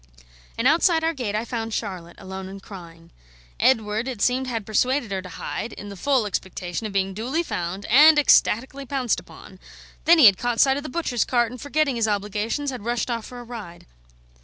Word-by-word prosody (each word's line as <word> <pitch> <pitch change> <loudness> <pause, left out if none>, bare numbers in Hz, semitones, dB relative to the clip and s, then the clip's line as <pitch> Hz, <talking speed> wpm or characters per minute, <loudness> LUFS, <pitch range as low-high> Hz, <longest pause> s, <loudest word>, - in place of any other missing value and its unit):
And 230 - +2
outside 325 +2 +3
our 325 +1 +1
gate 240 -8 -3
I 220 +2 -1
found 225 -2 -4
Charlotte, 180 -5 -5
alone 190 0 -8
and 195 +1 -9
crying. 170 -4 -12 0.5
Edward, 220 -1 +2
it 255 -5 -5
seemed, 255 +4 +1
had 225 -4 -3
persuaded 245 +2 0
her 190 -1 -2
to 185 - -10
hide, 225 - -5
in 205 - -9
the 200 - -8
full 260 +3 +1
expectation 190 0 -4
of - - -8
being 195 -1 0
duly 255 - -2
found 180 - -4
and 300 +6 +7
ecstatically 270 -1 +3
pounced 260 -4 0
upon; - - -14 0.5
then 340 +1 +7
he 305 - +7
had 200 -3 +7
caught 240 -1 -1
sight 270 0 +4
of - - -3
the 300 - -7
butcher's 255 -6 -1
cart, 240 -2 +1
and, 250 -2 -9
forgetting 285 -3 0
his 225 -1 +1
obligations, 210 +7 -2
had 250 -5 -7
rushed 240 +1 -2
off 230 -2 -4
for 245 - -9
a - - -8
ride. 220 -8 -9
230 Hz, 205 wpm, -23 LUFS, 200-265 Hz, 0.5 s, and